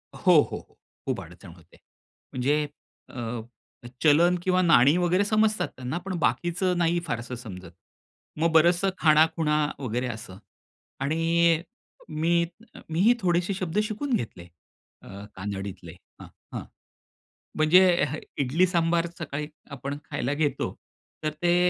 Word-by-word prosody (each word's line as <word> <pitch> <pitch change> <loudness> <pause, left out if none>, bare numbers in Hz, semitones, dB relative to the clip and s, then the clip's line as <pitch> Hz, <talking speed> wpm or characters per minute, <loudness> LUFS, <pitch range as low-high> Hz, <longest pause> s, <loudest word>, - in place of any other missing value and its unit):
हो, - - +3
हो, - - +8 0.2
हो. - - -16 0.3
खूप - - -1
अडचण 85 +1 -13
होते. 85 -1 -20 0.6
म्हणजे 145 +4 +1 0.4
अ, 120 -2 -5 0.6
चलन 165 +4 +5
किंवा 185 0 +2
नाणी 155 -4 +5
वगैरे 180 +2 +2
समजतात 215 +1 +2
त्यांना, 130 +5 -4
पण 195 - -3
बाकीचं 175 +8 0
नाही 175 0 +2
फारसं 120 -1 -4
समजत. 95 -8 -9 0.7
मग 165 +1 +2
बरचसं 175 +4 +4
खाणाखुणा 155 0 +4 0.2
वगैरे 125 -1 -2
असं 110 -5 -7 0.6
आणि 165 +3 +2 0.5
मी 155 +2 -1 0.6
मीही 185 +9 +4
थोडेसे 180 0 +1
शब्द 185 0 -2
शिकून 230 +6 -3
घेतले 90 - -5 0.5
अ, 100 +1 -10
कांनडीतले. 95 -3 -6 0.3
हां, - - -10 0.3
हां. - - -4 0.9
म्हणजे 175 +2 +5
हं. 155 - -4 0.2
इडली 145 +7 +2
सांबार 170 -1 +1
सकाळी 150 -2 -4 0.2
आपण 140 +1 -5
खायला 130 +2 -2
घेतो, 145 -2 -1 0.5
तर 155 - +1
ते 175 0 +3
155 Hz, 125 wpm, -26 LUFS, 125-175 Hz, 0.9 s, हो